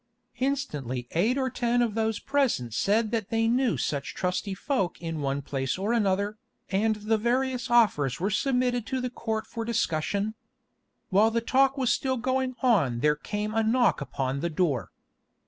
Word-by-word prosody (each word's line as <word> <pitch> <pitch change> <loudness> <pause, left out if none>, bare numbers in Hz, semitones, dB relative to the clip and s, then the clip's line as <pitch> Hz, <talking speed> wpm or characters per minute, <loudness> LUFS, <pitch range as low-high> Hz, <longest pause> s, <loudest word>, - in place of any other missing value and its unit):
Instantly 150 - -2
eight 215 +11 +2
or 260 -1 0
ten 240 +1 +1
of 230 -3 -1
those 220 -1 0
present 265 - 0
said 210 - +1
that 225 -4 -2
they 225 0 +1
knew 245 0 +2
such 140 -2 -3
trusty 190 +2 -2
folk 195 -4 -1
in 165 -2 -4
one 140 0 -1
place 135 +1 -2
or 205 +5 0
another, 205 -1 0 0.3
and 215 +3 +2
the 215 +1 0
various 250 +1 0
offers 205 - +3
were 195 +4 0
submitted 250 0 +1
to 260 - -1
the 250 -1 -3
Court 220 -3 -3
for 230 - -5
discussion. 205 -2 -1 0.8
While 205 +3 +4
the 230 +1 0
talk 270 +4 +2
was 260 -3 +2
still 260 -1 0
going 260 +1 -1
on 145 - +3
there 150 +1 +3
came 210 +7 -4
a 225 - +2
knock 235 -1 +2
upon 135 -1 -2
the 170 +4 -1
door. 155 -6 0
220 Hz, 170 wpm, -27 LUFS, 175-245 Hz, 0.8 s, While